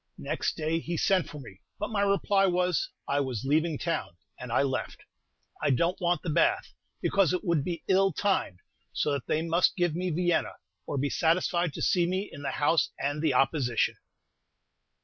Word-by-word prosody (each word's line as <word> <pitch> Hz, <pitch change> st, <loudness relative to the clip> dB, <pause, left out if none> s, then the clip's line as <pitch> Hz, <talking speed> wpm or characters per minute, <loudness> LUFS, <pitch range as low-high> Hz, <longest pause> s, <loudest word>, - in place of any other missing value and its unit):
Next -, -, -2 dB
day 160 Hz, +1 st, 0 dB
he 170 Hz, +1 st, -4 dB
sent 185 Hz, -4 st, +2 dB
for 150 Hz, -, -8 dB
me, 100 Hz, -8 st, -12 dB, 0.2 s
but 210 Hz, -, -4 dB
my 205 Hz, -2 st, 0 dB
reply 200 Hz, 0 st, +2 dB
was, 180 Hz, -2 st, +1 dB, 0.2 s
"I 140 Hz, -, +1 dB
was 130 Hz, -3 st, -3 dB
leaving 155 Hz, +2 st, +1 dB
town;" 165 Hz, -, -3 dB, 0.2 s
and 125 Hz, -1 st, -7 dB
I 120 Hz, -, +3 dB
left. 130 Hz, -2 st, -3 dB, 0.6 s
I -, -, +1 dB
don't 170 Hz, +9 st, +1 dB
want 175 Hz, 0 st, +1 dB
the 180 Hz, -, -3 dB
Bath, 340 Hz, -, +1 dB, 0.3 s
because 195 Hz, -4 st, +3 dB
it 180 Hz, -, -1 dB
would 170 Hz, -7 st, +1 dB
be 170 Hz, +2 st, -4 dB
"ill 195 Hz, 0 st, +4 dB
timed;" 160 Hz, -, -1 dB, 0.3 s
so 150 Hz, -, 0 dB
that 140 Hz, -4 st, -3 dB
they 155 Hz, -, 0 dB
must 170 Hz, +2 st, +2 dB
give 175 Hz, -4 st, +1 dB
me 180 Hz, +2 st, -2 dB
Vienna, 175 Hz, +1 st, 0 dB, 0.3 s
or 145 Hz, -, -3 dB
be 140 Hz, +1 st, 0 dB
satisfied 170 Hz, 0 st, +1 dB
to -, -, -4 dB
see 175 Hz, -2 st, +3 dB
me 190 Hz, +3 st, -2 dB
in 140 Hz, -, -9 dB
the 145 Hz, -, -2 dB
House 145 Hz, 0 st, +2 dB
and 145 Hz, +2 st, -2 dB
the 155 Hz, -5 st, +1 dB
Opposition! 125 Hz, -3 st, +1 dB
165 Hz, 190 wpm, -28 LUFS, 145-180 Hz, 0.6 s, ill